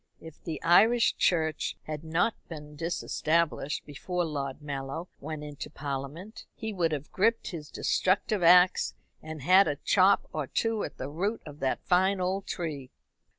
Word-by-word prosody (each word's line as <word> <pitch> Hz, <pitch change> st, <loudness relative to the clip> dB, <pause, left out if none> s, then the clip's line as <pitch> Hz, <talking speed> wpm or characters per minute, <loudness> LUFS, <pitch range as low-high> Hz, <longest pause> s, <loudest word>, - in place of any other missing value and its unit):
If 160 Hz, -2 st, -13 dB
the 160 Hz, -2 st, -4 dB
Irish 220 Hz, +8 st, +5 dB
Church 160 Hz, -3 st, 0 dB
had 155 Hz, 0 st, -6 dB
not 165 Hz, +7 st, +1 dB, 0.2 s
been 150 Hz, -2 st, -9 dB
disestablished 165 Hz, -1 st, -1 dB
before 175 Hz, +5 st, -3 dB
Lord 140 Hz, -3 st, -4 dB
Mallow 145 Hz, +3 st, -5 dB
went 155 Hz, +1 st, -6 dB
into 145 Hz, -1 st, -7 dB
Parliament, 145 Hz, -, -6 dB
he 220 Hz, -1 st, -5 dB
would 170 Hz, -4 st, +1 dB
have 150 Hz, -1 st, -4 dB
gripped 225 Hz, +4 st, +1 dB
his 160 Hz, -4 st, -7 dB
destructive 190 Hz, +2 st, +1 dB
axe 180 Hz, +1 st, +5 dB, 0.3 s
and 155 Hz, -3 st, -8 dB
had 185 Hz, +5 st, +6 dB
a 145 Hz, -, 0 dB
chop 190 Hz, +6 st, +3 dB
or 150 Hz, -3 st, -2 dB
two 225 Hz, -, 0 dB
at -, -, -6 dB
the 130 Hz, -, -5 dB
root 195 Hz, +10 st, -2 dB
of 150 Hz, -1 st, -10 dB
that 130 Hz, -1 st, -1 dB
fine 190 Hz, +2 st, +3 dB
old 190 Hz, +2 st, -2 dB
tree. 150 Hz, -7 st, -4 dB
165 Hz, 155 wpm, -28 LUFS, 150-185 Hz, 0.3 s, had